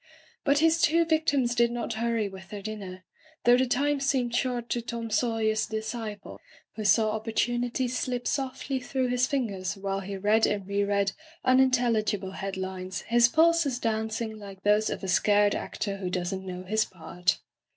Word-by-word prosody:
But 280 0 +3
his 325 +2 +3
two 335 +2 +4
victims 290 -6 +2
did 235 0 +3
not 240 -1 -3
hurry 230 -1 0
with 190 -1 -11
their 205 -1 -7
dinner, 195 -4 -7 0.4
though 240 +1 +6
the 255 +1 +2
time 280 +3 +1
seemed 260 -3 0
short 245 -2 -1
to 240 - -1
Tom 230 -1 -5
Sawyer's 220 -1 +1
disciple, 220 -1 -5 0.4
who 220 - -4
saw 215 +1 +4
oppor 220 - -18
tunity 240 +2 0
slip 250 0 -2
sofdy 265 -1 -2
through 255 0 -1
his 250 +1 +2
fingers 200 - -2
while 195 0 -2
he 195 0 -5
read 210 +3 +3
and 200 -2 -2
reread 200 0 +1 0.3
unintelligible 240 -7 +2
head 195 0 -5
lines, 185 0 -4
his 235 0 +4
pulses 320 -2 +3
dancing, 220 -1 -2
like 195 -2 -11
those 210 +1 +3
of - - -4
a - - -3
scared 205 +3 +3
actor 200 -2 -3
who 185 -2 -4
does 180 0 -2
not 190 - -4
know 185 -1 -6
his 215 +3 +1
part. 180 0 -2
220 Hz, 170 wpm, -27 LUFS, 200-250 Hz, 0.4 s, though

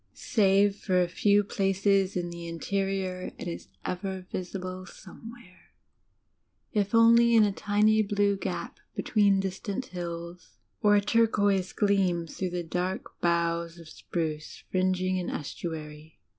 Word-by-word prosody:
Save 200 -1 +3
for 185 -3 +1
a 180 - +2
few 205 +3 +3
places 195 -1 +1
in 175 -1 -3
the 170 0 -7
interior, 190 +1 -2
it - - -6
is 170 - -6 0.2
ever 185 0 -4
visible 185 0 -5
somewhere, 225 0 -13 1.0
if 205 0 +1
only 235 +1 +6
in 220 - +7
a 205 - +1
dny 210 +1 +2
blue 205 -1 +2
gap 195 - -5 0.2
between 200 -3 +3
distant 195 +5 -3
hills, 170 0 -7 0.2
or 205 -2 +5
a 205 - +4
turquoise 205 -3 +2
gleam 190 -5 +1
through 185 +3 -4
the 175 0 -3
dark 180 +3 -4
boughs 170 0 0
of 165 -2 -12
spruce 155 -2 -5
fringing 185 0 +1
an 180 - -3
estu 160 +3 -4
ary. 150 0 -12
190 Hz, 135 wpm, -28 LUFS, 175-205 Hz, 1.0 s, in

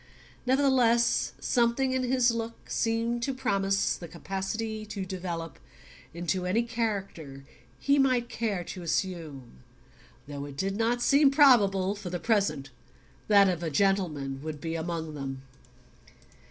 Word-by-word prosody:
Nevertheless 250 -3 +3
something 245 +2 +1
in 260 0 0
his 250 -1 +2
look 230 0 -6
seemed 230 +1 0
to 265 +2 -2
promise 195 -6 +1
the 170 - -9
capacity 195 +6 -4
to 200 -2 -5
develop 175 -4 -5 0.5
into 175 +2 -2
any 220 +6 +2
character 200 - -4 0.3
he 280 0 +2
might 255 -3 +2
care 210 -7 -2
to 180 +2 -8
assume; 160 - -3 0.7
though 145 -1 -6
it 140 -1 -10
did 195 +4 -1
not 235 +3 0
seem 280 0 +5
probable 205 -10 +5
that, 205 - -10
for 185 - -5
the 175 0 -3
present, 170 - 0 0.6
that 200 -2 +6
of 180 -3 -1
a 165 - -2
gentleman 150 -6 0
would 155 0 -6
be 165 +2 -4
among 165 -1 -4
them. 135 -2 -6
195 Hz, 140 wpm, -28 LUFS, 165-235 Hz, 0.7 s, that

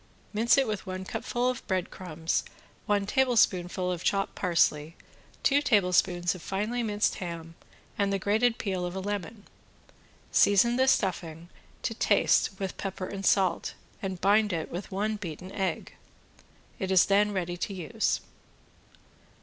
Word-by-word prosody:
Mix 225 +3 +4
with 220 -7 +1
it - - -17
one 185 0 -5
cupful 245 +5 -2
of 255 -1 -2
bread 185 -3 -1
crumbs, 165 -3 -2 0.4
one 205 -1 +2
tablespoonful 190 -7 +2
of 175 -1 -4
chopped 195 -1 0
parsley, 165 -3 +1 0.5
two 285 +1 +4
tablespoons 180 -6 +2
of 185 - -10
finely 210 +7 -2
minced 210 -2 0
ham 170 -2 -6 0.5
and 200 -1 +2
the 195 - +1
grated 220 +5 +2
peel 190 -3 -2
of 175 +1 -4
a - - -2
lemon. 205 +1 -4 0.9
Season 205 +4 +4
the 260 +1 +3
stuffing 170 -7 0 0.3
to - - -1
taste 195 - +2
with 190 -2 -4
pepper 195 -1 -4
and 195 +1 -3
salt 190 -3 +2 0.3
and 190 -2 -4
bind 205 +2 +4
it 165 -3 -3
with 180 +4 -6
one 210 +3 -1
beaten 185 -1 -7
egg. 195 -2 -3 0.9
It 190 - -2
is 190 -2 +6
then 205 +1 +3
ready 180 -3 -2
to 190 - -3
use. 195 +4 -1
195 Hz, 150 wpm, -28 LUFS, 180-210 Hz, 0.9 s, is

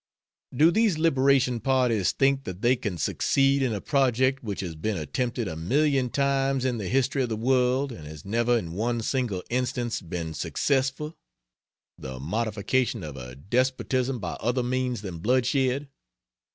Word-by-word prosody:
Do 155 +6 +4
these 215 -4 +2
liberation 135 -5 +3
parties 125 -7 +2
think 135 0 +1
that 95 +3 -7
they 125 +2 +5
can 105 -7 -4
succeed 135 - +2
in 130 -3 +1
a 105 - -2
project 130 +1 +1
which 100 -4 -4
has 90 -4 -5
been 100 +6 -2
attempted 120 - -2
a 80 - -4
million 135 - +1
times 135 -1 +1
in 125 -3 0
the 100 - -4
history 135 +4 +1
of 125 - -1
the 110 - -1
world 130 +3 +2
and 80 -10 -9
has 75 -1 -10
never 120 +4 +2
in 85 -7 -4
one 115 +4 -1
single 115 -7 -1
instance 125 -1 -1
been 85 -2 -5
successful 135 - -1 0.8
the 65 -1 -7
"modification" 110 - -1
of 75 -3 -7
a 60 -1 -8
despotism 130 - 0
by 90 -6 -4
other 125 +2 0
means 125 -3 -1
than 90 -4 -6
bloodshed? 130 - +1
125 Hz, 160 wpm, -26 LUFS, 100-135 Hz, 0.8 s, they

